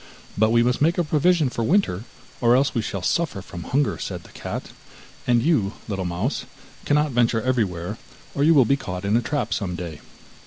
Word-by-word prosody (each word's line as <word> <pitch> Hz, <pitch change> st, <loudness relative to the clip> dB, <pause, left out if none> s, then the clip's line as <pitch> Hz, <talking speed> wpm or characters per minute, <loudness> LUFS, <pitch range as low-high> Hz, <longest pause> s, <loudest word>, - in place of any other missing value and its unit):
'But 110 Hz, +2 st, +3 dB
we 115 Hz, +1 st, +4 dB
must 125 Hz, +2 st, 0 dB
make 165 Hz, +3 st, +3 dB
a 175 Hz, -, +2 dB
provision 155 Hz, +1 st, +3 dB
for 115 Hz, -, -3 dB
winter, 115 Hz, -, +1 dB, 0.4 s
or 120 Hz, 0 st, +5 dB
else 135 Hz, +2 st, +2 dB
we 115 Hz, -, 0 dB
shall 100 Hz, -3 st, -4 dB
suffer 170 Hz, -, 0 dB
from 90 Hz, -2 st, -8 dB
hunger,' 140 Hz, +2 st, 0 dB
said -, -, -5 dB
the -, -, -16 dB
cat; -, -, -6 dB, 0.6 s
'and 120 Hz, -1 st, +3 dB
you, 120 Hz, -11 st, +2 dB
little 95 Hz, -4 st, -3 dB
mouse, 90 Hz, +10 st, -2 dB, 0.4 s
cannot 150 Hz, 0 st, +2 dB
venture 115 Hz, -2 st, +2 dB
everywhere, 100 Hz, -10 st, -1 dB, 0.3 s
or 140 Hz, -, 0 dB
you 160 Hz, +2 st, +5 dB
will 135 Hz, -4 st, +6 dB
be 140 Hz, -, +3 dB
caught 90 Hz, -8 st, -5 dB
in 100 Hz, +2 st, +2 dB
a 120 Hz, -, +3 dB
trap 145 Hz, +3 st, -2 dB
some 90 Hz, -4 st, -2 dB
day. 85 Hz, -3 st, -7 dB
120 Hz, 200 wpm, -23 LUFS, 100-145 Hz, 0.6 s, will